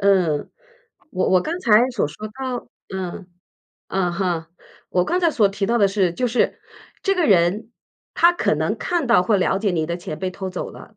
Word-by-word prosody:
嗯， 180 Hz, -7 st, +2 dB, 0.6 s
我 185 Hz, -, 0 dB
我 185 Hz, -1 st, +4 dB
刚 335 Hz, -, -3 dB
才 235 Hz, -, +4 dB
所 235 Hz, -10 st, 0 dB
说 210 Hz, +8 st, -8 dB
到 255 Hz, +2 st, -5 dB, 0.3 s
嗯， 185 Hz, 0 st, -5 dB, 0.6 s
嗯 180 Hz, -2 st, 0 dB
哼。 175 Hz, -3 st, -1 dB, 0.4 s
我 180 Hz, -1 st, +2 dB
刚 360 Hz, -, 0 dB
才 340 Hz, -2 st, +3 dB
所 215 Hz, -9 st, +3 dB
提 195 Hz, 0 st, -2 dB
到 235 Hz, +3 st, +1 dB
的 200 Hz, -, +5 dB
是， 195 Hz, -3 st, +1 dB
就 250 Hz, +6 st, -1 dB
是， 245 Hz, +1 st, 0 dB, 0.4 s
这 390 Hz, -, +2 dB
个 355 Hz, -3 st, +1 dB
人， 195 Hz, -, +2 dB, 0.4 s
他 340 Hz, +1 st, +5 dB
可 350 Hz, -, 0 dB
能 -, -, -1 dB
看 345 Hz, -6 st, -1 dB
到 230 Hz, -6 st, +5 dB
或 210 Hz, +3 st, +2 dB
了 190 Hz, 0 st, +1 dB
解 200 Hz, 0 st, 0 dB
你 160 Hz, -3 st, -1 dB
的 170 Hz, +1 st, -2 dB
钱 165 Hz, -3 st, -7 dB
被 185 Hz, -1 st, -2 dB
偷 190 Hz, 0 st, -5 dB
走 185 Hz, -, -5 dB
了。 215 Hz, -, -14 dB
195 Hz, 215 characters per minute, -21 LUFS, 180-240 Hz, 0.6 s, 的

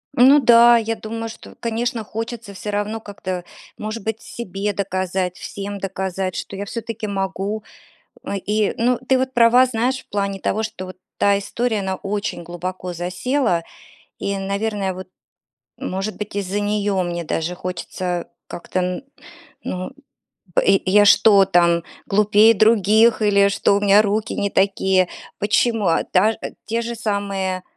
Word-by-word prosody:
Ну 270 Hz, +3 st, +7 dB
да, 235 Hz, -2 st, +7 dB
я 225 Hz, 0 st, -1 dB
думаю, 225 Hz, +1 st, -5 dB
что, -, -, -12 dB
конечно, 235 Hz, 0 st, -2 dB
хочется 225 Hz, -1 st, -6 dB
всё 210 Hz, +2 st, -5 dB
равно 205 Hz, +2 st, -2 dB
как-то, 185 Hz, -4 st, -6 dB, 0.3 s
может 215 Hz, 0 st, -5 dB
быть, 220 Hz, 0 st, -3 dB
себе 205 Hz, -3 st, -4 dB
доказать, 185 Hz, -1 st, -2 dB
всем 200 Hz, 0 st, -6 dB
доказать, 190 Hz, -1 st, -3 dB
что -, -, -5 dB
я 200 Hz, -, -4 dB
всё-таки 225 Hz, 0 st, -5 dB
могу. 195 Hz, +2 st, -3 dB, 0.6 s
Э, 200 Hz, -, -3 dB
и, 210 Hz, +1 st, 0 dB
ну, 245 Hz, +1 st, +2 dB
ты 260 Hz, -1 st, +4 dB
вот 260 Hz, 0 st, -1 dB
права, 240 Hz, +2 st, +6 dB
знаешь, 255 Hz, +2 st, -1 dB
в -, -, -24 dB
плане 200 Hz, -1 st, -2 dB
того, 220 Hz, +4 st, -1 dB
что 185 Hz, -4 st, -5 dB
вот 185 Hz, -, -10 dB, 0.2 s
та 200 Hz, 0 st, +3 dB
история, 220 Hz, +2 st, -1 dB
она 190 Hz, -1 st, -2 dB
очень 200 Hz, -3 st, -3 dB
глубоко 180 Hz, +1 st, -5 dB
засела 180 Hz, +3 st, -1 dB, 0.6 s
и, 200 Hz, 0 st, -2 dB
наверное, 200 Hz, 0 st, -2 dB
вот, 185 Hz, 0 st, -8 dB, 0.7 s
может 195 Hz, +3 st, -4 dB
быть, 210 Hz, -1 st, -6 dB
из-за 200 Hz, 0 st, -2 dB
нее 205 Hz, -2 st, 0 dB
мне 175 Hz, -1 st, -3 dB
даже 165 Hz, +3 st, -2 dB
хочется 180 Hz, 0 st, -4 dB, 0.2 s
как-то 185 Hz, +1 st, -4 dB
н 180 Hz, +7 st, -2 dB, 0.6 s
ну, 185 Hz, 0 st, -4 dB, 0.7 s
б -, -, +3 dB, 0.2 s
я 205 Hz, +2 st, +5 dB
что 200 Hz, -1 st, +6 dB
там, 170 Hz, -2 st, +3 dB, 0.2 s
глупее 210 Hz, +2 st, +5 dB
других 220 Hz, +1 st, +4 dB
или 200 Hz, -1 st, +4 dB
что 200 Hz, 0 st, +2 dB
у 205 Hz, -, 0 dB
меня 205 Hz, 0 st, +6 dB
руки 215 Hz, +2 st, -1 dB
не 200 Hz, -, 0 dB
такие? 190 Hz, -1 st, +2 dB, 0.3 s
Почему? 215 Hz, 0 st, +1 dB
А 165 Hz, -, +2 dB
таж 210 Hz, +4 st, +2 dB, 0.3 s
те 230 Hz, +1 st, -1 dB
же 235 Hz, 0 st, -4 dB
самые, 195 Hz, -4 st, -2 dB
200 Hz, 150 wpm, -21 LUFS, 190-225 Hz, 0.7 s, Ну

